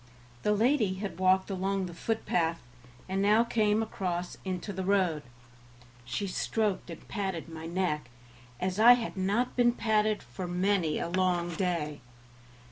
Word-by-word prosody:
The 210 Hz, -, +1 dB
lady 220 Hz, -3 st, +2 dB
had 195 Hz, -2 st, -5 dB
walked 190 Hz, +1 st, +3 dB
along 195 Hz, 0 st, -1 dB
the 175 Hz, -, -7 dB
footpath, 170 Hz, -5 st, -1 dB, 0.5 s
and 190 Hz, +1 st, -1 dB
now 210 Hz, +3 st, +5 dB
came 220 Hz, -2 st, +2 dB
across 180 Hz, -4 st, -3 dB
into 190 Hz, +1 st, -4 dB
the 190 Hz, 0 st, -3 dB
road. 185 Hz, -5 st, +2 dB, 0.8 s
She 120 Hz, +12 st, -2 dB
stroked 200 Hz, +1 st, -1 dB
and 165 Hz, -, -9 dB
patted 190 Hz, -6 st, -3 dB
my 160 Hz, 0 st, -7 dB
neck, 170 Hz, -6 st, -1 dB, 0.5 s
as 185 Hz, +2 st, -2 dB
I 235 Hz, +3 st, +9 dB
had 240 Hz, -2 st, -2 dB
not 200 Hz, +6 st, 0 dB
been 240 Hz, -1 st, +4 dB
patted 215 Hz, -2 st, +1 dB
for 120 Hz, +10 st, -6 dB
many 180 Hz, -2 st, +1 dB
a -, -, -2 dB
long 175 Hz, -1 st, 0 dB
day. 160 Hz, -6 st, -2 dB
190 Hz, 145 wpm, -29 LUFS, 175-210 Hz, 0.8 s, I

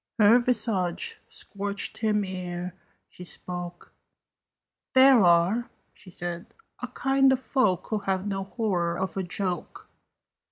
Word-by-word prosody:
Her 225 Hz, +2 st, +6 dB
visage 225 Hz, -, 0 dB
scorched 200 Hz, +1 st, -4 dB
him 210 Hz, -2 st, +1 dB
ere 180 Hz, -1 st, -5 dB, 0.3 s
she 180 Hz, -, -12 dB
spoke: 175 Hz, -1 st, -6 dB, 1.0 s
"There 260 Hz, -1 st, +8 dB
are," 175 Hz, +7 st, +3 dB, 0.2 s
she 185 Hz, -, -16 dB
said, 175 Hz, 0 st, -6 dB, 0.3 s
"a -, -, -3 dB
kind 270 Hz, 0 st, +2 dB
of 260 Hz, -, +2 dB
folk 255 Hz, -9 st, +1 dB
Who 215 Hz, -, +1 dB
have 195 Hz, -1 st, -2 dB
no 195 Hz, -1 st, -3 dB
horror 180 Hz, -6 st, -1 dB
of 190 Hz, +1 st, -3 dB
a 195 Hz, -, -1 dB
joke. 180 Hz, -1 st, -4 dB
195 Hz, 125 wpm, -26 LUFS, 180-225 Hz, 1.0 s, There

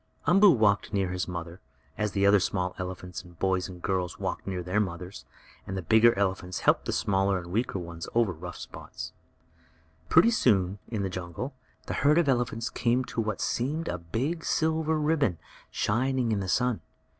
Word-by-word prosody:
Umboo 195 Hz, +6 st, +7 dB
walked 105 Hz, -, +3 dB
near 95 Hz, -2 st, +1 dB
his 90 Hz, 0 st, -2 dB
mother, 85 Hz, 0 st, -6 dB, 0.3 s
as 105 Hz, -1 st, -2 dB
the 100 Hz, -1 st, +2 dB
other 100 Hz, 0 st, +6 dB
small 90 Hz, -1 st, -1 dB
elephant 90 Hz, -1 st, -5 dB, 0.2 s
boys 95 Hz, 0 st, 0 dB
and 90 Hz, -1 st, -11 dB
girls 90 Hz, -3 st, -1 dB
walked -, -, -4 dB
near 90 Hz, -2 st, -3 dB
their 90 Hz, +4 st, 0 dB
mothers, 90 Hz, -1 st, -4 dB, 0.4 s
and 95 Hz, -, -4 dB
the 95 Hz, -, -4 dB
bigger 110 Hz, +5 st, +5 dB
elephants 95 Hz, -2 st, -1 dB
helped -, -, +3 dB
the -, -, -1 dB
smaller 95 Hz, -1 st, +1 dB
and 85 Hz, -1 st, -7 dB
weaker 110 Hz, 0 st, 0 dB
ones 85 Hz, -2 st, -6 dB
over 115 Hz, -6 st, +3 dB
the 80 Hz, -, -16 dB
rough 90 Hz, +1 st, -7 dB
places. -, -, -8 dB, 1.0 s
Pretty 230 Hz, -, +6 dB
soon, 100 Hz, -, +2 dB
in 110 Hz, -4 st, -2 dB
the 95 Hz, -, -1 dB
jungle, 90 Hz, -, -5 dB, 0.3 s
the -, -, -4 dB
herd 150 Hz, +2 st, +5 dB
of 170 Hz, -3 st, +3 dB
elephants 120 Hz, -3 st, 0 dB
came 125 Hz, +1 st, +1 dB
to 115 Hz, -, -2 dB
what 110 Hz, -2 st, -2 dB
seemed 150 Hz, +7 st, -1 dB
a 90 Hz, -, -2 dB
big 130 Hz, -, -2 dB
silver 160 Hz, 0 st, +1 dB
ribbon, 150 Hz, -, +1 dB, 0.3 s
shining 125 Hz, +2 st, 0 dB
in 105 Hz, -, +1 dB
the 95 Hz, -1 st, -3 dB
sun. 125 Hz, -4 st, +1 dB
100 Hz, 180 wpm, -28 LUFS, 90-125 Hz, 1.0 s, Umboo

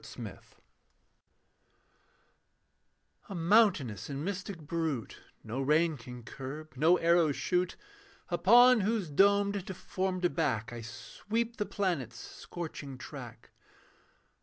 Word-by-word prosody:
CYCLOPEAN -, -, -8 dB, 2.9 s
A 195 Hz, -, -5 dB
mountainous 170 Hz, -, +3 dB
and 140 Hz, +2 st, -4 dB
mystic 195 Hz, -1 st, -4 dB
brute 155 Hz, -6 st, -3 dB, 0.2 s
No 120 Hz, +5 st, -4 dB
rein 155 Hz, +4 st, +3 dB
can 125 Hz, -1 st, -10 dB
curb, 145 Hz, +6 st, -8 dB
no 160 Hz, +7 st, +4 dB
arrow 170 Hz, -2 st, +4 dB
shoot, 180 Hz, +5 st, 0 dB, 0.5 s
Upon 235 Hz, +8 st, +6 dB
whose 205 Hz, -5 st, -1 dB
domed 200 Hz, +3 st, +3 dB
deformed 185 Hz, -1 st, -2 dB
back 120 Hz, -9 st, 0 dB
I 120 Hz, -, -6 dB
sweep 225 Hz, -, -4 dB
the 210 Hz, -, -2 dB
planets 150 Hz, -, -2 dB
scorching 145 Hz, -3 st, -7 dB
track. -, -, -10 dB
170 Hz, 100 wpm, -31 LUFS, 140-195 Hz, 2.9 s, Upon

